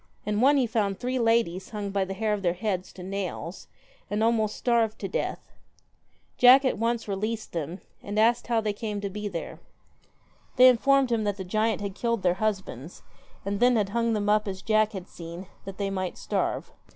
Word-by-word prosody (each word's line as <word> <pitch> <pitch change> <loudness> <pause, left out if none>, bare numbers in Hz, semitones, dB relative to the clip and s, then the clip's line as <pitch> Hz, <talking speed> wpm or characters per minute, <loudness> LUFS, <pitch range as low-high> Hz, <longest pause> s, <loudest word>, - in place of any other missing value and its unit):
In 210 +1 0
one 285 +3 +5
he 260 - +3
found 205 -4 0
three 255 +1 -1
ladies 225 -6 +1
hung 205 -2 -4
by 195 -1 0
the 195 +1 -5
hair 215 +1 0
of 205 - -2
their 175 -2 +1
heads 190 -2 -2
to 180 - -10
nails, 190 -2 -5 0.4
and 210 +1 0
almost 220 -2 +1
starved 230 -3 +1
to - - -4
death. - - -4 0.9
Jack 255 +2 +8
at 260 - 0
once 230 0 0
released 215 +3 -3
them, 165 +2 -4 0.2
and 205 +1 -5
asked 235 +2 +3
how 230 -2 +2
they 210 -1 -1
came 210 0 -4
to 200 -1 -4
be 210 +1 -4
there. 170 -5 -6 1.0
They 255 0 +9
informed 270 +1 +3
him 225 -2 +1
that 205 -1 -1
the 190 - -4
giant 215 +3 0
had 200 -1 -4
killed 235 0 -1
their 180 -1 +3
husbands, 190 - -3 0.4
and 200 0 -2
then 245 0 +5
had 205 -3 +1
hung 230 +2 0
them 205 -1 -1
up 210 0 +3
as 190 -1 -5
Jack 215 0 +2
had 190 -2 -6
seen, 170 +2 -9 0.2
that 195 0 -8
they 200 -1 -2
might 185 -2 -3
starve. - - -2
210 Hz, 200 wpm, -27 LUFS, 195-230 Hz, 1.0 s, They